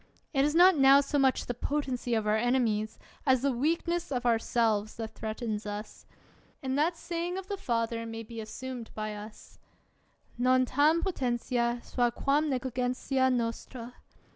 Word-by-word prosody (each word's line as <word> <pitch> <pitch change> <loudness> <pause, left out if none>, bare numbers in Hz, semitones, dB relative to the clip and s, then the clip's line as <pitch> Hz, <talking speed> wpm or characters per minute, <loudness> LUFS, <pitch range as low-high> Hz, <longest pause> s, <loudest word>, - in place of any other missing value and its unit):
It 270 -1 +3
is 300 +2 +1
not 365 +2 +7
now 275 -1 +7
so 285 +1 0
much 265 -1 +2
the 245 - -2
potency 250 -2 -2
of 220 -1 0
our 210 0 +2
enemies, 220 -2 +1 0.3
as 260 -3 +3
the 280 - +3
weakness 335 +6 -1
of 250 -2 -2
ourselves, 225 -2 +1
that 225 -1 -5
threatens 220 -1 -4
us; 205 +1 -7 0.6
and 265 0 -1
that 325 +4 +1
saying 345 +2 -3
of 385 - -5
the 405 - -2
Father 230 -9 -1
may 225 0 -6
be 225 0 -7
assumed 245 +2 -7
by 215 0 -3
us, 210 +1 -11 0.8
Non 255 +1 +4
tarn 300 +6 +3
potentia 240 -7 -1
sua 245 -1 +1
quam 285 +5 +1
neghgentia 260 0 0
nostra. 235 0 -3
250 Hz, 155 wpm, -29 LUFS, 230-280 Hz, 0.8 s, not